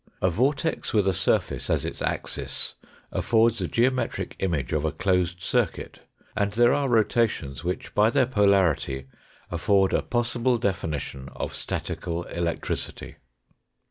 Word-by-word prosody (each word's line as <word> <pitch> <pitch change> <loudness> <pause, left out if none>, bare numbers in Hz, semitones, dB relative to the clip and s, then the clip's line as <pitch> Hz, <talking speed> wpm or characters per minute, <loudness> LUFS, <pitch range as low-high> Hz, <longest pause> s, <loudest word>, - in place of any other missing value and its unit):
A 95 - +2
vortex 140 - 0
with 105 -2 +3
a 95 - +3
surface 90 - 0
as - - +1
its - - -5
axis - - -3 0.4
affords 115 -1 +2
a 90 - 0
geometric 125 +5 0
image 80 -10 -1
of 75 -1 +1
a 80 - +1
closed 90 +1 0
circuit, - - -1 0.4
and 100 -1 0
there 120 +2 +5
are 140 -2 +1
rotations 110 - +1
which 90 +1 -3
by 105 +1 +4
their 130 +2 +3
polarity 95 - +2 0.5
afford 95 +2 +2
a - - +3
possible 120 0 0
definition 75 - -3
of - - -4
statical 85 0 -4
electricity. 85 -1 -4
100 Hz, 135 wpm, -26 LUFS, 85-115 Hz, 0.5 s, there